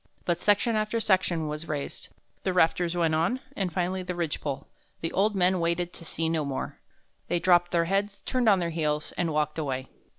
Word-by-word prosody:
But 175 -1 +1
section 205 +4 +3
after 215 +1 0
section 185 -6 +2
was 150 +2 -4
raised. 145 -2 -4 0.3
The 190 - -1
rafters 175 0 +2
went 165 -2 +2
on, 170 +11 +1 0.2
and 190 -3 -1
finally 185 +2 -1
the 180 0 -4
ridge 170 -3 -2
pole. 140 0 -3 0.4
The 165 - -2
old 205 +2 +2
men 185 0 +3
waited 170 +1 0
to - - -10
see 165 0 -2
no 160 -1 +1
more. 140 -2 -4 0.5
They 175 - +1
dropped 175 0 +4
their 170 -1 +2
heads, 200 +3 -1
turned 250 -3 +2
on 200 - +6
their 170 -2 -1
heels, 150 -2 -1
and 170 -2 -1
walked 150 +1 0
away." 130 -3 -3
175 Hz, 200 wpm, -28 LUFS, 160-185 Hz, 0.5 s, on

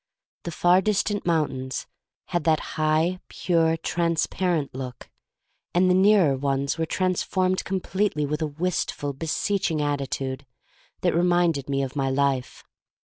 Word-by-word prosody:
The 170 - -3
far 175 +3 +4
dis 210 0 +1
tant 205 -3 -3
mountains 135 -6 -1 0.4
had 175 -2 -1
that 160 -2 +3
high, 155 +3 +1
pure, 165 -2 +1
transparent 170 -1 0
look, 125 -1 -7 0.6
and 185 +1 +4
the - - +5
nearer 190 -6 +5
ones 140 +2 -1
were 160 - 0
transformed 185 +1 0
completely 190 -4 -1
with 150 +2 -3
a 155 - +1
wistful, 150 -2 -2
beseeching 165 +3 -1
attitude 140 -2 -2 0.6
that - - +2
re 170 - +2
minded 175 -6 +2
me 135 0 0
of 135 +1 -5
my 135 -2 0
life. 135 -1 -1
160 Hz, 135 wpm, -25 LUFS, 140-180 Hz, 0.6 s, the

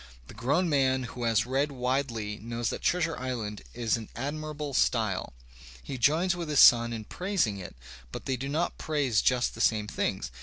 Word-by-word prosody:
The - - -12
grown 140 - +1
man 130 -3 +2
who 125 0 -5
has 115 -2 +2
read 135 +3 0
widely 125 -5 -2
knows 115 +1 -3
that - - -5
"Treasure 165 -2 +1
Island" 115 -5 -4
is 115 -1 0
in 110 - -9
admirable 150 +2 -4
style. 110 - +1 0.5
He 130 - -6
joins 165 +9 +3
with 170 -3 -5
his 150 - +2
son 120 0 +7
in 115 -2 -4
praising 175 - -1
it, 90 - -9 0.4
but - - -7
they 135 - 0
do 135 +2 -5
not 160 +4 -1
praise 140 -8 +1
just 125 -1 +2
the - - -6
same 110 -2 +2
things. 65 - -2
130 Hz, 185 wpm, -28 LUFS, 115-150 Hz, 0.5 s, son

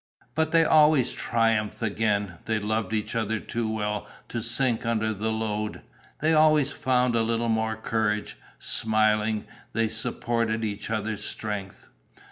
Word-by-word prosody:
But 160 +2 0
they 165 -1 +5
always 150 -4 +5
triumphed 115 -2 0
again: 100 -4 0
they 110 0 0
loved 105 -1 -1
each 110 -1 -2
other 110 -1 -1
too 115 0 -3
well 105 -1 -2 0.2
to 115 - -3
sink 120 +1 +1
under 110 -1 0
the 110 +2 -2
load. 110 -1 -3 0.4
They 160 +2 +3
always 155 -2 +4
found 125 -2 +1
a 115 - +3
little 115 +1 0
more 110 0 +1
courage; 110 -1 -1 0.2
smiling, 110 -1 +1 0.3
they 115 -1 +1
supported 115 0 -1
each 105 -1 -4
other's 110 -1 -2
strength. 100 -2 -5
110 Hz, 140 wpm, -26 LUFS, 105-115 Hz, 0.4 s, they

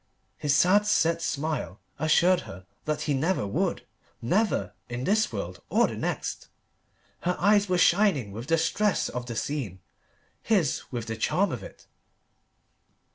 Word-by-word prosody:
His 145 -2 +1
sad, 200 +6 +4
set 165 -4 +2
smile 150 - -3 0.2
assured 170 +4 +4
her 90 +2 -10 0.2
that 155 -1 -1
he 150 - 0
never 155 - 0
would 100 - -1 0.3
never, 200 - 0 0.2
in 120 +1 -4
this 215 +7 +2
world 90 -4 -5
or - - +4
the - - -4
next. - - -3 0.7
Her 180 +1 -1
eyes 205 +1 +3
were 180 - +2
shining 175 - +3
with 115 +5 -7
the 165 - +3
stress 200 +5 +1
of 125 0 -5
the 120 - -5
scene: 110 - -3 0.6
his 185 - +1
with 120 -3 -4
the 110 - -4
charm 185 - +1
of 125 - -4
it. - - -12
155 Hz, 150 wpm, -27 LUFS, 120-185 Hz, 0.7 s, sad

